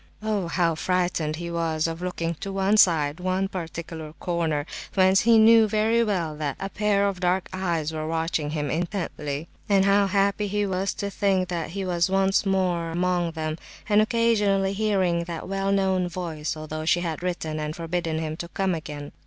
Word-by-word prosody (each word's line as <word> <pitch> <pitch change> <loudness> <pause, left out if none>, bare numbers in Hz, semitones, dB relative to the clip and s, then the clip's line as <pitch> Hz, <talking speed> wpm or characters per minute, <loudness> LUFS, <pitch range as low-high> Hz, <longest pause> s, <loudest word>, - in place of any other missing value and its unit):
Oh, 210 -5 -1
how 170 -1 +1
frightened 175 -2 0
he 170 +1 -5
was 165 -2 0
of 165 +1 -3
looking 170 -2 -2
to 195 - -5
one 195 +2 +2
side—one 180 +1 +2
particular 165 -3 -6
corner—whence 170 +3 0
he 230 0 +5
knew 225 0 +7
very 220 +2 +2
well 175 -8 -1
that 145 -3 -2
a 195 - -4
pair 200 -1 +1
of 195 -2 -3
dark 180 +1 +1
eyes 170 -4 -1
were 155 0 -3
watching 160 -2 -1
him 150 -3 -2
intently, 165 -4 -3 0.2
and 195 -1 +4
how 200 0 +4
happy 200 +1 +1
he 205 +1 0
was 190 0 -1
to 200 0 -3
think 190 -2 +1
that 170 -3 -3
he 195 - -2
was 175 0 +1
once 195 +1 +2
more 180 -3 +1
among 175 0 0
them, 155 0 -3 0.3
and 210 0 +5
occasionally 210 -4 +2
hearing 190 -5 +1
that 170 -1 -6
well 195 +1 -1
known 190 -2 +1
voice, 160 -4 -4
although 155 0 -5
she 175 +2 +2
had 165 -2 -3
written 165 -4 -3
and 150 0 -3
forbidden 165 -1 -2
him 155 -1 -3
to 170 - -5
come 190 +1 -1
again! 150 -3 -6
180 Hz, 180 wpm, -25 LUFS, 160-195 Hz, 0.3 s, knew